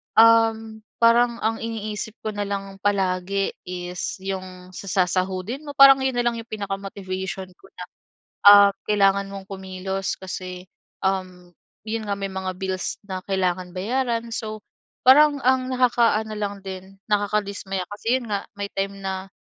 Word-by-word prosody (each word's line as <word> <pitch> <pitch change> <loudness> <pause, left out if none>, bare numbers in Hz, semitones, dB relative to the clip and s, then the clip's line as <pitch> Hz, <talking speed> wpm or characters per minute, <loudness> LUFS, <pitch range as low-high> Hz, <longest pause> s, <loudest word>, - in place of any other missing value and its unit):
um, 225 -1 +5 0.2
parang 235 +1 +5
ang 225 +1 0
iniisip 220 -1 -5
ko 215 - -2
nalang 200 -1 -4
palagi 195 -1 0 0.2
is 180 0 -4
'yung 185 -1 -6
sa 195 +2 -9 0.2
sasahudin 190 +10 -2
mo, 285 - -7
parang 275 -1 +9
'yun 265 -1 0
nalang 240 -1 0
yung 230 - -10
pinaka-motivation 195 -2 -5
ko - - -19
na 180 - -7 0.6
ah, 205 0 +10 0.2
kailangan 200 -1 +3
mong 195 -1 -8
kumilos 190 0 -4
kasi 185 -1 -7 0.4
um, 185 -2 -2 0.3
'yun 225 +1 -2
nga 200 - 0
may 195 0 -3
mga 190 0 -3
bills 190 -1 -3
na 190 -2 -5
kailangan 185 -2 -1
bayaran. 235 +3 -1
So 215 -2 -5 0.4
parang 290 +2 +7
ang 260 0 +3
nakaka-ano 235 -4 +2
lang 205 -1 -2
din 190 +1 -8
nakakadismaya 205 -2 -1
kasi 225 +5 0
yun 235 - -9
nga 200 -1 -2
may 200 0 -4
time 195 0 -3
na 190 0 -4
200 Hz, 140 wpm, -23 LUFS, 190-225 Hz, 0.6 s, ah